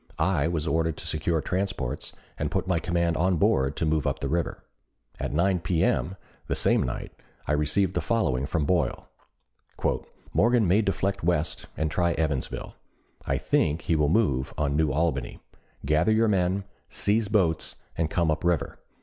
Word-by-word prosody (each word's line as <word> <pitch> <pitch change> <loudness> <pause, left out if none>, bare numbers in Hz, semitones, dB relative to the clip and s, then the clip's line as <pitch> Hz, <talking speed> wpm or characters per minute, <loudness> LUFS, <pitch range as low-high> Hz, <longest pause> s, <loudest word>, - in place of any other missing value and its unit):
I 85 -6 +2
was 80 -3 -1
ordered 80 -1 0
to - - -8
secure 80 +1 0
transports 95 -10 -2 0.2
and - - -2
put - - -1
my 90 -3 +1
command 85 0 0
on 90 +1 +2
board 70 -2 +2
to - - -1
move 80 -1 +1
up - - 0
the 70 - -3
river. 85 +3 -2 0.6
At - - -2
9 90 +4 +2
P.M. 85 +1 +1 0.3
the - - 0
same - - +3
night - - -4 0.3
I - - -1
received 80 +6 +1
the - - 0
following 70 - 0
from 80 -2 0
Boyle: 90 +2 0 1.2
"Morgan 115 -1 +4
may 95 +5 +4
deflect 95 -2 -1
west 85 -2 0
and 80 0 0
try 85 0 +1
Evansville. 75 -6 -2 0.5
I - - +1
think 80 +2 +1
he 80 - +1
will 75 -2 +2
move 70 - +1
on 70 -2 0
New 75 -1 +2
Albany. 70 -4 -1 0.5
Gather 75 +7 +3
your 110 +1 +4
men, 95 -1 +1 0.3
seize 105 +1 +1
boats, 90 -7 +1 0.2
and 80 -1 0
come 85 -2 +1
up 80 - -2
river. 85 -4 0
85 Hz, 165 wpm, -26 LUFS, 75-95 Hz, 1.2 s, Morgan